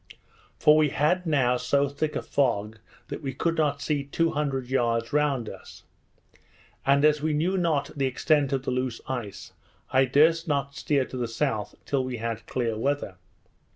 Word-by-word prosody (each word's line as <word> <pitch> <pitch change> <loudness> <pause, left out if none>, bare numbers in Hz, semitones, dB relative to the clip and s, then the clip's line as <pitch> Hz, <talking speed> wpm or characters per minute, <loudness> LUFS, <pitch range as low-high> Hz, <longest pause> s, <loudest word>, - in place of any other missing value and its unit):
For 150 0 +5
we 155 -1 +4
had 175 +6 +1
now 130 -5 +2
so 140 +3 +1
thick 145 +2 -3
a - - -2
fog, 110 -6 0 0.3
that - - -5
we 135 -2 -4
could 165 +4 0
not 145 -3 0
see 145 -2 0
two 165 +4 0
hundred 140 -3 -2
yards 115 -2 0
round 145 -6 +1
us; - - -11 1.0
and 140 +2 +4
as 150 -1 +3
we 155 0 0
knew 175 +6 +1
not 165 -6 0
the 135 -2 +1
extent 145 +2 +1
of 135 -2 -1
the - - -1
loose 125 -2 -2
ice, 120 -7 -6 0.4
I 130 +1 +4
durst 160 +6 +3
not 140 -2 -1
steer 140 -2 0
to 130 - -8
the 120 -1 -1
south 115 -3 -2
till 135 -2 0
we 130 -1 -4
had 115 0 -4
clear 115 -3 -1
weather. 140 -7 -2
140 Hz, 180 wpm, -26 LUFS, 125-150 Hz, 1.0 s, For